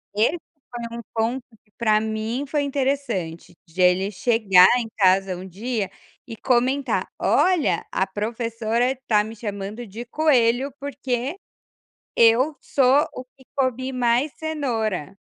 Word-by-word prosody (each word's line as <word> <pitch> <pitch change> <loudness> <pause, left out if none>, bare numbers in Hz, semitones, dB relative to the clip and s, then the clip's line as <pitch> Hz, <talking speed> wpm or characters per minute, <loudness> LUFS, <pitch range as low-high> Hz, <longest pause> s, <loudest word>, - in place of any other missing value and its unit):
Esse 225 +11 +2 0.3
foi 235 -1 -6
um - - -6
ponto 235 +3 -1 0.2
que 210 - -36
para 215 -2 +3
mim 220 +5 -3
foi 295 +1 0
interessante, 265 - -2
de 180 +3 -4
ele 180 +2 +3
chegar 200 -4 +5
em 225 -2 -4
casa 190 -1 +3
um 185 +1 -8
dia 210 +1 -3 0.4
e 225 - -7
comentar, 260 +3 0
olha 360 -5 +2
a 190 - +1
professora 230 +3 -1
tá 210 -2 +3
me 220 +1 -8
chamando 210 +2 -6
de 225 +4 -8
coelho, 260 -2 +2
porque 270 +1 -3 0.8
eu 245 +6 +4
sou 275 +3 +3
o 255 - -7
que 265 - -20
comi 260 -1 -1
mais 250 +3 +1
cenoura, 225 - -2
235 Hz, 135 wpm, -23 LUFS, 210-265 Hz, 0.8 s, chegar